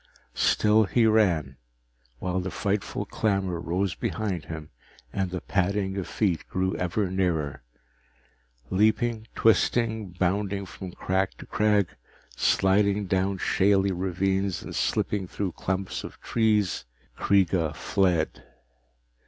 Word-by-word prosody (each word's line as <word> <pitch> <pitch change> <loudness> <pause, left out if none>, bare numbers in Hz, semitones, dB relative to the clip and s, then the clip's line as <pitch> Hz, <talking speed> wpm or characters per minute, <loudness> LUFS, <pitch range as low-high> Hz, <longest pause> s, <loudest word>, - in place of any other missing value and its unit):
Still 105 - +3
he 115 +3 +2
ran, 90 -11 +2 0.6
while 90 +8 -2
the 90 +1 -3
frightful 105 +1 -2
clamor 95 -5 -1
rose 90 +3 -1
behind 100 -7 -3
him 80 -1 -7 0.4
and 95 -2 -1
the 90 0 -4
padding 95 0 0
of 95 -4 -3
feet 90 -1 0
grew 95 0 0
ever 90 +2 -1
nearer. 85 -8 -1 1.1
Leaping, 110 +3 +2
twisting, 110 -1 +2
bounding 100 +2 -1
from 95 0 -8
crag 95 +2 -1
to - - -10
crag, 105 -3 +2 0.5
sliding 100 +5 +2
down 95 +1 0
shaly 95 +1 +2
ravines 95 +1 -1
and - - -7
slipping 100 -3 0
through 95 0 -3
clumps 95 +3 -3
of - - -9
trees, 105 -4 +1 0.3
Kreega 90 -5 +2
fled. 85 -10 0
95 Hz, 115 wpm, -26 LUFS, 90-105 Hz, 1.1 s, Still